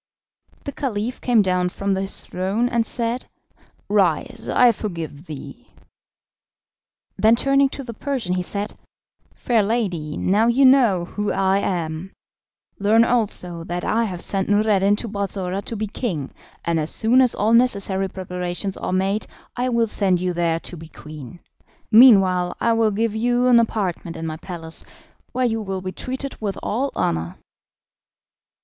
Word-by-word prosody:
The 280 - -5
Caliph 245 -4 -3
came 235 -4 +3
down 180 -1 +1
from 195 +2 -2
his 195 +1 -1
throne, 195 +6 -1
and 230 -2 0
said: 235 +1 -2 0.6
"Rise, - - 0
I 245 -1 +5
forgive 165 -7 -6
thee." 150 -3 -9 1.5
Then 220 +2 +5
turning 275 +2 +3
to 275 - -7
the 235 -2 -7
Persian 245 -6 -3
he 180 - 0
said: 200 +3 -4 0.6
"Fair 235 -3 +1
lady, 195 -9 -2
now 210 +5 +2
you 255 +3 +4
know 240 -10 +4
who 210 +3 -3
I 195 0 +2
am; 170 -1 -3 0.7
learn 220 +3 +4
also 190 -8 0
that 175 +1 -4
I 230 +1 +1
have 180 -5 -4
sent 195 -1 +2
Noureddin 205 -1 +3
to 230 - -3
Balsora 195 -2 -3
to 230 - -4
be 215 0 -2
king, 195 - -4 0.3
and 170 -1 +1
as 155 0 -2
soon 240 +4 +3
as 250 -2 +3
all 215 +3 +1
necessary 200 -5 +2
preparations 180 +1 -4
are - - -4
made 195 +3 0 0.3
I 250 +1 -1
will 235 -1 +2
send 195 -4 +1
you 180 0 -1
there 170 -1 0
to - - -8
be 165 0 -10
queen. 155 +1 -11 0.5
Meanwhile 195 -7 +6
I 230 - +2
will 225 -1 +3
give 220 +1 -1
you 245 +2 +1
an 245 -2 +6
apartment 190 -7 -2
in 165 - -5
my 155 -1 -4
palace, 165 -1 -7 0.5
where 255 0 0
you 225 -2 0
will 195 -2 -4
be 185 - -4
treated 260 +5 -5
with 200 -2 -3
all 260 +6 -1
honour." 80 0 -1
200 Hz, 155 wpm, -22 LUFS, 180-230 Hz, 1.5 s, Meanwhile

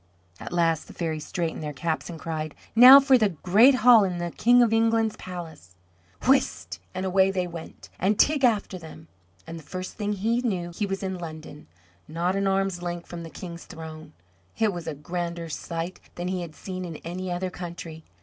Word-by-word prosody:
At - - -8
last 165 -2 +1
the - - -12
fairies 160 -3 -3
straightened 170 -3 -3
their 150 -1 -4
caps 155 0 -3
and 165 -2 -7
cried, 155 -2 -4 0.2
"Now 255 +4 +11
for 270 -2 +4
the 215 -2 +3
great 220 +9 +6
hall 240 -4 +8
in 180 -2 -1
the 175 0 -3
King 245 +5 +5
of 225 -2 +2
England's 225 -1 +2
palace!" 160 - -9 0.5
Whist 85 - +1 0.2
and 185 - -2
away 190 +1 +3
they 185 -2 -1
went, 170 -2 -9
and 200 +3 +1
Teig 295 -2 +3
after 210 -6 +1
them; 85 - -12 0.4
and 165 +7 -7
the - - -14
first 185 +5 -7
thing 210 -1 -1
he 225 +5 0
knew 185 -8 -2
he 200 +4 -2
was 195 0 -4
in 190 -1 -3
London, 155 -3 -9 0.4
not 175 +4 -1
an 195 0 0
arm's 195 -2 0
length 175 -1 -4
from 175 -1 -8
the 165 - -8
King's 170 0 -9
throne. 160 -2 -10 0.4
It 220 -3 +2
was 175 -2 -7
a 150 - -3
grander 170 +2 -4
sight 165 +3 -5 0.2
than 175 +1 -4
he 185 -1 -2
had 165 -3 -8
seen 185 -1 -6
in 170 -3 -6
any 180 +2 -4
other 180 +1 -2
country. 170 -3 -8
175 Hz, 200 wpm, -26 LUFS, 165-195 Hz, 0.5 s, Now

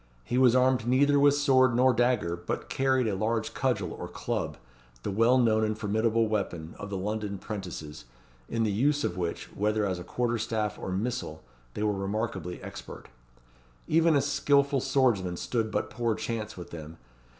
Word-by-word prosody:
He 125 - 0
was 125 -2 +5
armed 130 -2 +3
neither 140 +3 +4
with 145 0 +5
sword 130 -4 +4
nor 130 +1 +5
dagger, 120 -8 +1
but 85 0 -5
carried 130 -2 +2
a 105 - 0
large 110 +2 -1
cudgel 115 -10 -1
or - - -6
club, - - -3 0.5
the - - -2
well 115 +5 +4
known 110 -3 +3
and 110 0 -1
formidable 110 +2 +1
weapon, 85 -7 -3
of 105 - -6
the 100 - -3
London 105 +1 -3
'prentices, 90 - -7 0.4
in 115 -1 0
the 110 - +1
use 145 +8 +1
of 90 - -1
which, 85 -2 -4
whether 105 +1 +1
as 90 -3 -2
a - - -6
quarterstaff 110 -2 -1
or - - -5
missile, 100 -6 -3 0.3
they 105 - -2
were 105 -1 +2
remarkably 95 -3 -3
expert. - - -9 0.8
Even 165 0 +4
a 140 - +4
skilful 140 0 +2
swordsman 100 -12 +1
stood 115 +1 -1
but - - -2
poor 115 -2 0
chance 110 -2 -4
with 90 - -9
them. 80 0 -8
110 Hz, 170 wpm, -28 LUFS, 100-130 Hz, 0.8 s, was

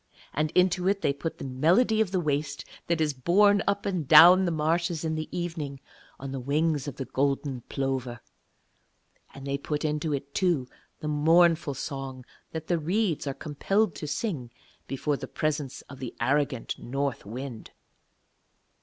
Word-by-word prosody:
And 155 +1 0
into 180 0 +3
it 200 0 +1
they 140 - +2
put 160 +3 -5
the - - -8
melody 175 - +3
of 215 - +1
the 185 -1 0
waste 145 -2 -2 0.2
that 170 -1 +1
is 155 -2 +1
borne 200 +9 +4
up 200 0 0
and 180 -7 -2
down 175 +5 +9
the 175 - 0
marshes 165 +1 0
in 160 - 0
the 155 0 -4
evening 165 -6 -4 0.4
on 135 0 -6
the 135 - -4
wings 150 +2 0
of 145 - -5
the 135 - -5
golden 135 0 -1
plover. 130 -3 -2 1.2
And 135 0 -9
they 140 0 -2
put 150 +2 -3
into 150 +1 -1
it, 140 0 -4
too, 170 -9 +1 0.3
the 150 - -4
mournful 160 0 +3
song 135 -2 -6 0.2
that 160 -1 -6
the 175 -1 0
reeds 175 -1 0
are 135 - -2
compelled 190 +6 0
to 150 - -5
sing 150 - -3 0.4
before 140 +2 -1
the - - -7
presence 150 -3 -2
of 140 - -12
the 125 -3 -6
arrogant 140 -3 0
North 135 0 -3
Wind. 120 +2 -7
150 Hz, 165 wpm, -27 LUFS, 135-170 Hz, 1.2 s, down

